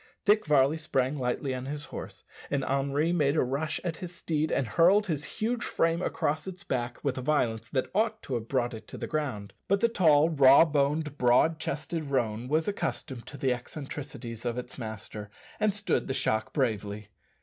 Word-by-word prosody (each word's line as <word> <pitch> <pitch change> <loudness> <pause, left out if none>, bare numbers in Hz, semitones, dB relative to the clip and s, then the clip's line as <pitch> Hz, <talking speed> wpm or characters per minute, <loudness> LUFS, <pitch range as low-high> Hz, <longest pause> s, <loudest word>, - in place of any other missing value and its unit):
Dick 210 -3 +4
Varley 145 +1 +4
sprang 135 -2 0
lightly 130 +2 -1
on 130 0 -5
his 145 +1 -5
horse, - - -7 0.3
and 140 -2 0
Henri 140 +4 +1
made 145 -4 +2
a - - +3
rush 145 +5 -2
at 170 -3 -3
his 180 0 -7
steed 155 -2 -1
and 135 - +1
hurled 175 - +4
his 155 -6 -2
huge 230 +2 -1
frame 165 +1 +1
across 155 -2 -1
its 190 +1 -7
back 120 -5 -2
with 135 -2 -1
a - - -4
violence 115 -5 0
that 130 -2 -1
ought 220 +4 +1
to 135 - -5
have 115 -2 -2
brought 120 -2 0
it 110 - -9
to - - -8
the - - -4
ground; 130 -10 -3
but 200 +1 +3
the 235 - +4
tall, 160 -9 +4
raw 140 0 +7
boned, 150 0 0
broad 125 +6 +4
chested 155 +1 -3
roan 120 -4 -1
was 155 +3 +1
accustomed 130 - -3
to 140 - -8
the 130 -1 +1
eccentricities 125 -3 -7
of 120 -1 -2
its 125 0 -6
master, 110 -2 -7 0.3
and 215 - +3
stood 205 +1 -1
the 135 - -2
shock 110 -4 0
bravely. 105 -5 -2
140 Hz, 195 wpm, -29 LUFS, 125-160 Hz, 0.3 s, raw